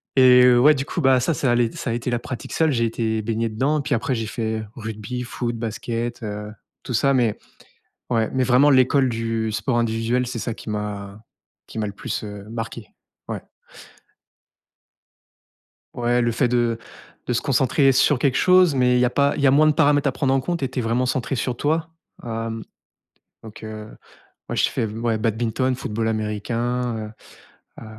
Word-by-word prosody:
et, 125 -1 +7
ouais 140 +6 +6
du 135 +1 -3
coup, 170 - -3
bah, 135 -2 +4
ça, 130 +7 0
ça 130 -1 +1
allait 120 -1 +2
ça - - -5
a - - 0
été 120 +1 -3
la 120 - +1
pratique 125 +1 -7
seule, 160 -2 +2
j'ai 115 -3 +1
été 110 -1 -1
baigné 115 +1 -1
dedans, 140 +7 0
puis 145 0 -2
après 125 +3 -1
j'ai 115 -1 -2
fait, 110 -1 -3
rugby, 110 +2 -5
foot, 120 -1 -4
basket, 115 +1 -4
heu, 105 0 -5 0.3
tout 125 - -5
ça 140 +4 +3
mais, 120 -5 +1 0.7
ouais, 115 -2 +1
mais 130 -1 +2
vraiment 130 +4 +5
l'école 130 0 +4
du 115 -1 -2
sport 120 +3 0
individuel, 115 +2 0
c'est 120 -1 -4
ça 115 +1 -3
qui 110 - -10
m'a 105 -1 -5 0.5
qui - - -7
m'a 105 - -1
le 100 - -6
plus, - - -5
heu, 105 -1 -8
marqué. 115 -1 -6 0.4
Ouais. - - -4 2.5
Ouais, 120 0 +1
le 120 0 +1
fait 125 +3 +1
de 120 -1 +1 0.5
de 125 - 0
se 120 - 0
concentrer 135 +1 +3
sur 135 +1 +3
quelque 135 -1 +1
chose, 180 -4 +5
mais 125 -1 +3
il - - +2
y 125 - +4
a - - +2
pas 140 +2 +2
il - - -2
y 140 - +5
a - - +5
moins 150 +3 +5
de - - +5
paramètres 145 -2 +3
à - - +2
prendre 135 0 0
en 135 - +2
compte 170 +5 -3
et 135 - -1
tu 130 - -4
es - - 0
vraiment 115 +3 0
centré 130 +1 -1
sur 125 0 -2
toi. 160 +4 0 0.3
Hem, 115 -1 -4 0.8
donc 110 -1 -12
heu, 110 -1 -7 0.6
moi - - -3
j'ai - - +2
fait - - -2
m 110 +2 -5
ouais, 115 -2 +1
badminton, 115 +3 0
football 110 -2 -3
américain, 115 +3 -2
heu, - - -11 0.7
heu, - - -9
120 Hz, 195 wpm, -22 LUFS, 115-130 Hz, 2.5 s, et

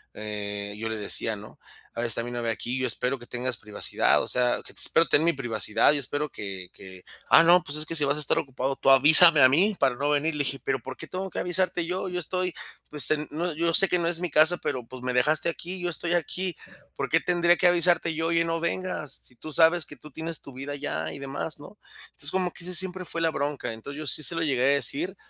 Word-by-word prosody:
Eh, 105 -1 -6
yo 110 +1 -4
le 110 - -3
decía, 110 +1 0
¿no? 105 +1 -12 0.4
"A - - -6
veces 120 -1 -2
está 115 - -1
mi 120 - -6
novia 120 -1 -3
aquí, 120 +3 -5
yo 130 - -2
espero 125 +3 -2
que 120 - -12
tengas 125 0 -4
privacidad", 105 -1 -1
o - - -5
sea, 125 -1 0
que - - -13
te - - -9
espero 165 - +5
tener 155 - +3
mi 170 - +3
privacidad, 110 -4 0
yo 150 - 0
espero 145 +2 -4
que 95 -6 -7
que: 95 -1 -14 0.3
"Ah, - - +7
no, 175 +2 +5
pues 145 0 +4
es 155 - +3
que 165 - -2
si 155 - +7
vas 140 +1 0
a - - -3
estar 150 - +1
ocupado, 135 0 -3
tú 135 - 0
avísame 155 +3 +8
a 130 - +7
mí 190 +10 +2
para 130 -2 +1
no 140 +3 -2
venir", 150 +2 0
le 145 - 0
dije. 135 0 -4
"¿Pero 135 -1 -2
por 130 +3 -9
qué - - -10
tengo 190 +1 -6
que - - -5
avisarte 180 -1 0
yo? 185 +2 -4
Yo 180 0 -4
estoy, 180 +1 -3 0.4
pues, 150 -3 +1
en 150 0 -1
no 170 +3 -2
yo 165 +1 +1
sé 195 - +7
que 180 - +2
no 170 - -1
es 170 -1 +1
mi 180 0 -3
casa, 155 +4 +5
pero, 125 -2 -3
pues, 130 +2 -11
me 125 0 -2
dejaste 150 +6 +2
aquí, 180 +2 -7
yo 175 - -2
estoy 175 0 -2
aquí. 175 +1 -2 0.4
¿Por 135 -1 -4
qué 165 - +2
tendría 175 0 +1
que - - -1
avisarte 175 -1 +3
yo?, 160 +1 -2
oye 165 0 +1
no 165 0 -2
vengas. 170 -3 -4
Si 125 - -10
tú 155 +6 -10
sabes 165 +1 +3
que 145 - -12
tú 150 - -15
tienes 160 +3 -6
tu 140 - -13
vida 135 +3 -7
allá 80 - -5
y - - -8
demás", 140 +3 -3
¿no? 145 +8 -14 0.3
Entonces, 145 - -5
como 185 -1 -1
que 170 - -12
ese 180 +1 -3
siempre 185 0 0
fue 165 - -4
la 165 -1 +1
bronca. 145 -5 -4
Entonces, 125 +6 -10
yo 155 - -6
sí 135 - +2
se 170 - 0
lo 165 - -2
llegué 135 -5 -1
a 140 +2 +3
decir 160 +6 +2
150 Hz, 265 wpm, -25 LUFS, 125-170 Hz, 0.4 s, avísame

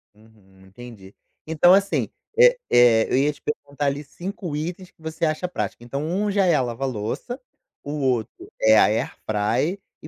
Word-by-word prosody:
Uhum, 100 -3 -22
entendi. 100 -1 -13 0.3
Então 160 +3 +5
assim, 195 +1 +2 0.3
eh - - +7
eh, 120 -2 +5
eu, - - +3
ia 145 +3 +3
te 145 - -21
perguntar, 145 -1 -4
ali, 140 +2 -1
5 175 0 -6
itens 175 +4 -5
que - - -30
você 160 +1 -3
acha 155 +3 -1
prático, 175 -8 -5
então 135 +4 -4
1 200 +6 -1
já 195 -1 +2
é 175 -3 +4
a 145 - +2
lava-louça, 125 - -4 0.4
o 145 - -6
outro 130 -6 -2
é 110 0 +6
a - - +7
air 115 +4 -1
fryer 115 - 0 0.2
e - - -10
140 Hz, 180 wpm, -23 LUFS, 115-175 Hz, 0.4 s, eh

